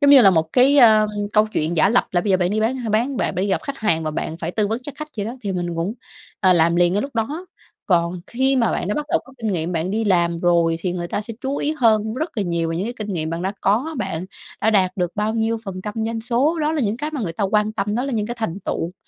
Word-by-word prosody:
Giống 285 -1 +5
như 275 -3 +9
là 195 - +7
một 160 -2 0
cái, 270 +3 +5
à, 215 -3 +7 0.3
câu 215 0 +4
chuyện 160 +2 -1
giả 175 - +5
lập 240 +3 +3
là 175 - +3
bây 200 - -2
giờ 185 - +5
bạn 180 -1 0
đi 215 +1 0
bán 235 +4 +1
ha 240 -3 -4
bán 240 +5 +1
bạn - - -1
phải 185 - +1
đi - - -2
gặp 190 - 0
khách 280 -1 -5
hàng 165 -7 +1
và 155 - -1
bạn 160 +1 -4
phải 165 0 -4
tư 210 +2 0
vấn 225 +2 -1
cho 290 - -7
khách 305 +1 -6
vậy 205 - -2
đó, 240 +3 -5
thì 200 -2 -2
mình 175 -1 -3
cũng, 180 +7 -2 0.5
ờ, 185 -2 +5
làm 170 0 +3
liền 175 0 +4
ngay 205 - +1
lúc 275 -2 -7
đó. 295 +11 -2 0.4
Còn 175 -1 +1
khi 265 +2 +1
mà 235 -2 +2
bạn 180 - -2
đã 210 - 0
bắt 300 0 -3
đầu - - +2
có 270 - -16
kinh 220 -3 -2
nghiệm, 170 0 -2
bạn 170 +2 -1
đi 220 +2 -1
làm 170 -3 +2
rồi 170 -2 +3
thì 180 -1 -2
người 175 -1 -3
ta - - -2
sẽ 220 +1 -8
chú 275 +1 -2
ý 300 - 0
hơn 220 -3 +2
rất 315 0 -4
là 210 - +1
nhiều 170 -2 -1
về 165 - -2
những 190 +5 -2
cái 240 - -3
kinh 210 -2 -4
nghiệm 160 -1 -2
bạn 165 +1 -3
đã 190 +2 -1
có, 250 +11 +1
bạn 185 -3 -3 0.4
đã 220 - +3
đạt 185 -3 +3
được 180 -1 -1
bao 215 +2 0
nhiêu 225 0 0
phần 185 -2 -6
trăm 210 -1 -5
doanh 225 0 -3
số, 260 +8 +1
đó 305 +1 +1
là 315 - 0
những 215 -1 0
cái 300 +4 -3
mà 290 -5 -4
người 170 -6 -3
ta 200 - -2
quan 210 +2 +1
tâm. 205 0 -2
Đó 245 +3 0
là 275 - -3
những 210 -2 -1
cái 240 - -4
thành 200 -3 -3
tựu 175 -1 -3
210 Hz, 310 wpm, -21 LUFS, 175-240 Hz, 0.5 s, như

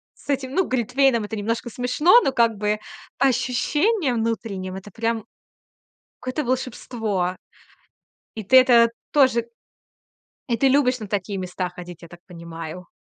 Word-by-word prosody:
С - - -21
этим, 265 -2 -1
ну, 375 - +2
глитвейном 250 -1 +2
это 215 +1 -5
немножко 230 +3 -2
смешно, 250 - +4
но 270 - 0
как 230 -1 +3
бы 210 +1 -1 0.4
по 275 - +3
ощущениям 270 - +1
внутренним- 200 -4 -3
это 195 +2 -9
прям 225 +1 -2 1.0
какое-то 255 +4 -3
волшебство, 225 -7 -2 1.0
и 220 - -5
ты 260 +7 +6
это 240 -3 +6 0.2
тоже 255 -5 +3 1.0
И 235 - +1
ты 270 - +3
любишь 260 -2 +3
на 215 - -7
такие 200 0 -3
места 180 0 -4
ходить, 175 -1 -11
я 170 - -11
так 175 +1 -14
понимаю? 170 0 -9
230 Hz, 145 wpm, -23 LUFS, 195-255 Hz, 1.0 s, ты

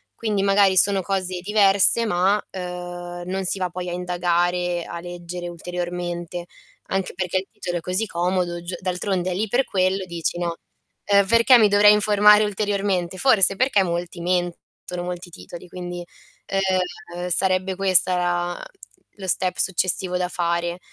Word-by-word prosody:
Quindi 210 -3 -1
magari 195 -1 +4
sono 200 0 +4
cose 185 -1 -2
diverse, 200 +3 +4
ma, 195 +1 +2
ehm, 175 -1 -6
non 190 +1 -2
si 195 - 0
va 185 - -1
poi 180 +1 -5
a - - -5
indagare, 175 0 -1
a 170 - -7
leggere 175 0 -7
ulteriormente. 175 0 -5 0.4
Anche 195 -1 -1
perché 180 0 -2
il 190 +1 -3
titolo 180 -5 -4
è - - -12
così 185 +5 0
comodo 175 -1 -1
giu 175 +1 -5
d'altronde 185 0 -2
è - - -2
lì 215 +3 -1
per 255 +4 +2
quello, 185 0 0
dici 170 -1 -3
no: 170 -1 -2 0.5
"Ehm, 200 -1 +4
perché 230 +3 +6
mi 215 - +6
dovrei 205 +1 +6
informare 210 0 +5
ulteriormente?" 195 -3 -1
Forse 195 -5 +4
perché 255 -6 +3
molti 175 0 -4
mentono, 175 0 -3
molti 180 0 -6
titoli, 175 +1 -11
quindi, 175 0 -7 0.4
ehm, 180 -2 -2
sarebbe 185 +1 +1
questo 185 -1 +4
la 175 0 0
mh, - - -10 0.6
lo 190 -2 -7
step 180 +1 0
successivo 185 0 0
da 180 0 -2
fare. 170 0 -2
180 Hz, 155 wpm, -22 LUFS, 175-195 Hz, 0.6 s, perché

